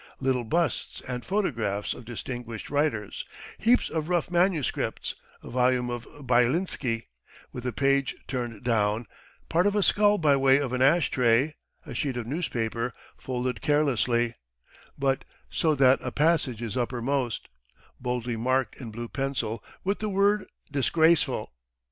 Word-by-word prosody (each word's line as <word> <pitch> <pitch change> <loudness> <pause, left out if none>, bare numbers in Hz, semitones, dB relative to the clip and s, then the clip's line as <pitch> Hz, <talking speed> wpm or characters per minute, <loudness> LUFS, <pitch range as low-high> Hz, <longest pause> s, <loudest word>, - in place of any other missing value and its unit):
Little 130 -2 0
busts 165 +1 -1
and 125 -1 -5
photographs 115 - -1
of 125 - -11
distinguished 120 -1 -6
writers, 140 -9 0 0.4
heaps 240 +3 +4
of 160 0 -3
rough 175 -1 0
manuscripts, 175 -4 0 0.3
a - - -9
volume 125 0 +2
of 120 -1 -5 0.2
Byelinsky 125 -1 +1 0.5
with 125 0 -5
a - - 0
page 140 +2 +1
turned 120 -4 -4
down, 110 -1 +1 0.4
part 175 +4 +3
of 205 - +1
a 205 - +3
skull 205 +1 +4
by 150 -5 +4
way 135 0 +5
of 135 -3 -2
an 130 - 0
ash 150 +6 +4
tray, 125 +4 +3 0.3
a - - -7
sheet 135 -4 -1
of 120 - -3
newspaper 120 -5 -2 0.2
folded 125 0 -3
carelessly, 125 -6 +2 0.6
but 135 -1 +1 0.3
so 155 -2 +2
that 135 -1 +5
a - - -4
passage 145 -7 +1
is 110 -4 -4
uppermost, 125 -1 -1 0.5
boldly 125 -1 -2
marked 130 +3 0
in 120 - -6
blue 115 +2 -6
pencil 120 -5 -2 0.2
with 200 +2 0
the 215 - -2
word 200 +1 +2 0.2
"disgraceful." 160 - +2
130 Hz, 140 wpm, -27 LUFS, 120-155 Hz, 0.6 s, way